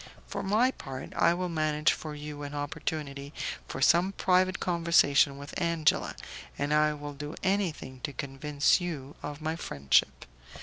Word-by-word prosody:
For - - -4
my 220 +7 +3
part, 135 - -8
I 170 - +3
will 180 +1 -2
manage 155 -2 +2
for 155 -2 -6
you 150 0 -7
an 145 0 -6
opportunity 145 -1 -4 0.3
for 135 - -3
some 180 +6 +4
private 185 -1 +2
conversation 165 -5 +3
with 145 +1 -9
Angela, 170 -3 +1 0.4
and 145 +1 0
I 150 0 +3
will 145 0 -7
do 145 +3 -7
anything 185 -9 -1
to - - -5
convince 140 +4 +1
you 150 -6 -5
of 145 +1 -6
my 160 +1 -1
friendship. 70 - +1
150 Hz, 150 wpm, -29 LUFS, 145-170 Hz, 0.4 s, some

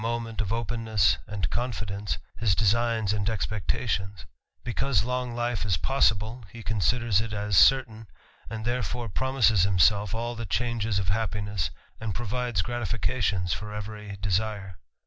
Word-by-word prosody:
moment 115 -1 -2
of 105 - -1
^pennesj^andjconfidence, 110 -1 -1 0.4
designs 110 0 +2
and 105 0 0
expectations; 100 -2 -2 0.4
because 120 -2 +1
_ - - -6
long 125 -1 -2
li 120 0 0
fe 105 - -2
is 90 -4 +2
possibi 110 - +1
h& 115 - -9
considers 110 0 +2
it 110 0 -5
as 105 -1 -1
certain, 115 +1 +5 0.4
and 110 -1 -5
therefore 120 -1 -1
promises 115 -3 +3 0.5
all 120 +1 -2
the 115 0 -5
changes 110 +3 0
of 95 -3 0
happiness, 100 -6 -1 0.3
and 110 -4 -3
provides 120 -3 -1
gratificati 110 -5 -1
for 105 0 -5
every 105 -1 -6
desire. 100 -2 -1
110 Hz, 125 wpm, -27 LUFS, 100-120 Hz, 0.5 s, certain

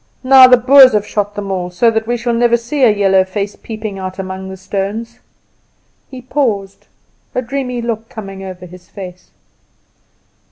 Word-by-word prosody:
"Now 260 0 +8
the 250 0 +6
Boers 260 +1 +7
have 210 -1 +1
shot 205 -1 -3
them 200 -1 -5
all, 180 -2 -3
so 225 +6 +2
that 220 0 -2
we 240 0 0 0.2
never 235 0 +3
see 240 +5 -4
a 255 - +6
little 210 -2 +1
yellow 195 -1 +4
face 200 +2 -4
peeping 215 -3 -7
out 185 0 -6
among 190 0 -6
the 190 - -8
stones." 200 +4 -5 0.9
He 255 -2 -10
paused, 220 -8 -2 0.5
a 250 - 0
dreamy 250 -1 -4
look 225 -1 -4
coming 195 -3 -9
over 185 -1 -9
his 180 0 -15
face. 180 -2 -10
210 Hz, 170 wpm, -15 LUFS, 190-240 Hz, 0.9 s, Now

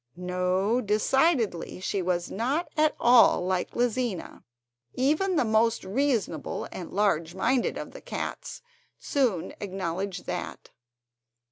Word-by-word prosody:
No, 180 +5 0
decidedly 220 - +1
she 190 +1 -2
was 175 -1 -1
not 270 - -1
at 305 -1 +3
all 240 -6 +6
like 185 -1 -1
Lizina. 240 -5 -2 0.5
Even 310 +9 +1
the 280 - +2
most 220 +1 +2
reasonable 210 - -1
and 175 - -7
large 175 -4 +1
minded 245 +6 +1
of - - -6
the - - -11
cats - - -6 0.3
soon 240 - 0
acknowledged 190 -1 -4
that. - - -5
210 Hz, 115 wpm, -27 LUFS, 180-255 Hz, 0.5 s, all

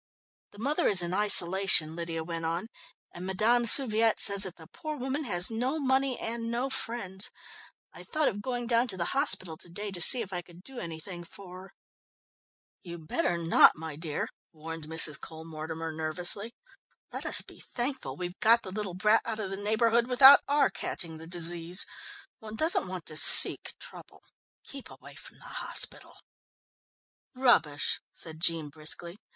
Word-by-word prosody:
"The - - -16
mother 290 - -1
is 185 -4 +3
in 175 +1 -5
isolation," 190 -5 +5
Lydia 165 -1 -5
went 165 0 -7
on, 170 +6 -4 0.4
"and 175 - -11
Madame 220 +6 0
Souviet 225 -4 +5
says 200 -1 +4
that 190 -3 0
the 160 - -14
poor 305 - -8
woman 270 +3 -5
has 180 -2 +1
no 250 +7 -3
money 265 -2 -1
and 230 0 -6
no 245 +3 -3
friends. 200 -6 -3 0.6
I - - -10
thought 310 -2 -2
of 205 -1 -4
going 245 +1 -5
down 235 +1 0
to 195 -5 +1
the 170 -1 -3
hospital 185 - 0
to 175 - -11
day 205 +4 -7
to 180 -2 -1
see 240 +7 +7
if 195 -2 -11
I 175 - -4
could 175 0 -19
do 265 +1 -10
anything 170 +1 -9
for 185 +1 -13
her." 190 0 -16 1.1
"You'd 170 -3 -11
better 175 +1 -1
not, 165 0 +4
my 160 -1 -9
dear," 155 -1 -5 0.2
warned 165 0 -9
Mrs. 155 -2 0
Cole 160 0 -11
Mortimer 160 0 -7
nervously. 175 +8 -3 0.6
"Let - - -6
us - - +4
be - - -15
thankful 260 +2 -5
we've 180 0 -7
got 230 +1 +3
the 185 - -9
little 200 -3 -6
brat 210 +4 +2
out 220 -1 -5
of 195 -3 -5
the - - -4
neighbourhood 225 +3 0
without 265 +2 +7
our 290 +1 +1
catching 160 -3 -6
the 160 - -12
disease. 170 +1 0 0.5
One 220 0 -10
doesn't 315 - +2
want 180 -3 -8
to 155 - -6
seek - - +6
trouble. - - -14 0.4
Keep 275 -2 -10
away - - -15
from - - -13
the - - -17 0.2
hospital." - - -3 1.2
"Rubbish!" 165 - +1
said 160 -2 -8
Jean 165 -2 +2
briskly. 160 +5 -6
190 Hz, 170 wpm, -27 LUFS, 165-235 Hz, 1.2 s, see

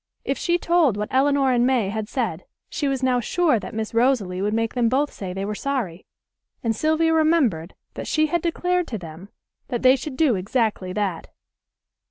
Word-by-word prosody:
If - - 0
she 345 -1 +1
told 335 - +2
what 210 0 -4
Elinor 275 0 +3
and 240 -1 +3
May 245 -6 +2
had 215 +1 -4
said 220 -11 -3 0.3
she 290 - -1
was 270 -1 -1
now 255 -1 +2
sure 305 - +1
that - - -8
Miss 220 0 -3
Rosalie 230 -7 +1
would 205 +1 0
make 225 +1 -1
them 240 -2 +2
both 280 +4 0
say 190 -2 -6
they 195 +2 -4
were 210 - -3
sorry; 210 -8 -3 0.6
and 225 -1 0
Sylvia 315 +5 +2
remembered 290 - +2 0.2
that - - -6
she 310 0 +2
had 335 +2 0
declared 355 +1 0
to 225 - -4
them 170 +2 -10 0.4
that 240 0 -3
they 260 +1 +7
should 265 0 -6
do 300 -5 +3
exactly 200 -1 -1
that. 190 -4 -2
245 Hz, 195 wpm, -23 LUFS, 205-290 Hz, 0.6 s, they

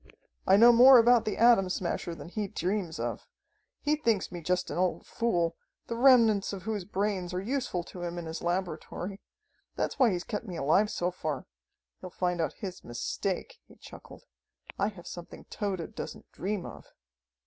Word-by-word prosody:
"I 190 - +6
know 235 +3 +8
more 250 +2 +9
about 235 0 +5
the 215 - -2
Atom 230 -5 +5
Smasher 175 -1 -3
than 165 - -10
he 210 +2 -3
dreams 185 -2 -2
of. - - -4 0.5
He 300 +1 +2
thinks 230 -10 0
me 175 -1 -6
just 180 +3 -1
an - - -4
old 185 -1 0
fool, 175 -8 0 0.3
the 230 - -4
remnants 230 -6 +5
of 190 -3 -6
whose 210 -3 -3
brains 195 -3 -2
are - - 0
useful 220 -4 -2
to 180 - -10
him 175 0 -4
in 170 - -5
his 160 +1 -5
laboratory. 185 +2 -3 0.5
That's - - -2
why 255 -3 +6
he's 175 -3 -2
kept 215 +1 -5
me 180 - -6
alive 165 +9 +3
so 180 -4 -1
far. 155 -5 -4 0.5
He'll 185 - -8
find 180 -1 -1
out 160 - -1
his 190 -4 -7
mistake," 185 - -4
he - - -17
chuckled. - - -13 0.6
"I 200 - +2
have 190 -5 -8
something 175 -1 -9
Tode 200 -2 -3
doesn't - - -8
dream 195 -1 -3
of." - - -10
190 Hz, 180 wpm, -29 LUFS, 175-220 Hz, 0.6 s, more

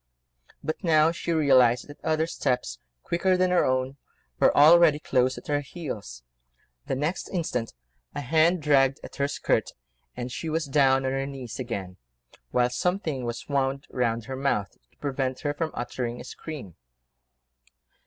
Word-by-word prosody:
But 155 - -4
now 160 -2 +4
she 170 0 -4
realised 130 -6 +4
that 145 - -13
other 160 0 +1
steps, 125 - -2 0.2
quicker 185 +2 +1
than 185 0 +2
her 180 - +4
own, 130 +1 0 0.4
were - - +4
already 155 +1 +7
close 130 -3 +1
at - - -10
her 145 -1 0
heels. 130 - -7 0.6
The - - -1
next 150 +7 -2
instant 140 - -3 0.4
a - - -2
hand 160 +4 +2
dragged 135 -2 +3
at - - -10
her 140 0 +1
skirt, 145 - 0 0.4
and 125 0 -4
she 160 - -4
was 160 +1 -1
down 135 -1 +3
on 130 - 0
her 135 0 -2
knees 130 -4 -7
again, 100 -7 -5 0.5
whilst 125 0 +1
something 165 -8 -1
was 120 0 -5
wound 135 0 -1
round 115 -3 -1
her 130 - -5
mouth 130 -7 0 0.2
to - - -34
prevent 130 -2 -2
her 145 -1 -1 0.2
uttering 120 0 -4
a - - -7
scream. 140 - -8
135 Hz, 155 wpm, -26 LUFS, 125-155 Hz, 0.6 s, already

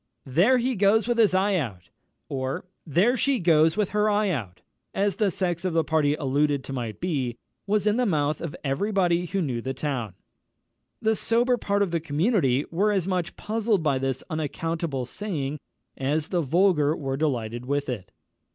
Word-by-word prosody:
"There 175 - +4
he 250 +2 0
goes 205 +1 +3
with 240 -1 +1
his 210 -4 +4
eye 195 +1 +2
out!" 95 - -5 0.4
or 135 +6 -3 0.2
"There 190 - +3
she 275 0 +1
goes 165 -3 +3
with 210 -3 +1
her 210 0 +2
eye 210 -1 +2
out!" 105 - -4 0.3
as 200 -1 +1
the 210 -3 +2
sex 175 -1 -2
of 185 -2 -1
the 165 -1 +3
party 150 -2 +2
alluded 145 0 0
to 135 - -7
might 120 -4 -4
be, 135 -9 -2 0.3
was 210 0 +1
in 210 +1 +2
the 250 -1 +2
mouth 150 -4 0
of 165 -3 -5
every 140 +10 -1
body 180 -3 +2
who 195 +1 -1
knew 125 -6 -2
the 130 +2 -4
town. 120 - -3 0.9
The 220 0 +3
sober 240 +3 +2
part 200 -3 0
of 190 - -2
the 170 - +1
community 150 - +1
were 200 +5 +2
as 190 -3 0
much 180 -1 -2
puzzled 215 -4 0
by 140 -4 +1
this 135 0 -2
unaccountable 160 -3 -3
saying 150 - -4 0.4
as 150 +3 -1
the 175 -2 +1
vulgar 160 -1 +3
were 135 -3 -3
delighted 125 -5 -2
with 145 +1 -1
it. 105 -7 -5
165 Hz, 185 wpm, -25 LUFS, 135-200 Hz, 0.9 s, There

